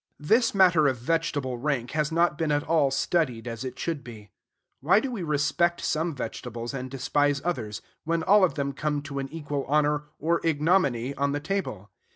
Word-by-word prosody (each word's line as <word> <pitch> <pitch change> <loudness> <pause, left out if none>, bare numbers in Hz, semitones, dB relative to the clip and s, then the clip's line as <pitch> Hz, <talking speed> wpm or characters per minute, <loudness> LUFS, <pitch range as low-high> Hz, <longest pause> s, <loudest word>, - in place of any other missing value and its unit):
This 225 +10 +2
matter 175 -6 +5
of 130 -2 +1
vegetable 140 -2 -1
rank 130 -3 -1
has 155 0 0
not 170 0 +2
been 155 0 -1
at 145 0 +1
all 155 -4 +2
studied 135 -3 0
as 115 +1 -5
it 130 -1 -6
should 165 -4 -3
be. 105 -5 -11 0.5
Why 170 - +4
do 265 +3 -3
we 225 -6 -4
respect 155 +2 +1
some 160 0 -1
vegetables 120 -1 -5
and 130 -1 -5
despise 145 +2 +1
others, 110 -12 -3 0.2
when 165 0 0
all 205 +2 +5
of 170 -7 +2
them 140 -1 -2
come 145 +1 -2
to 140 -2 -5
an 135 0 -4
equal 145 -3 -3
honor 150 +1 +1
or 170 +3 0
ignominy 145 -5 +2
on 140 0 0
the 145 - -1
table? 145 - -4
145 Hz, 190 wpm, -26 LUFS, 135-165 Hz, 0.5 s, matter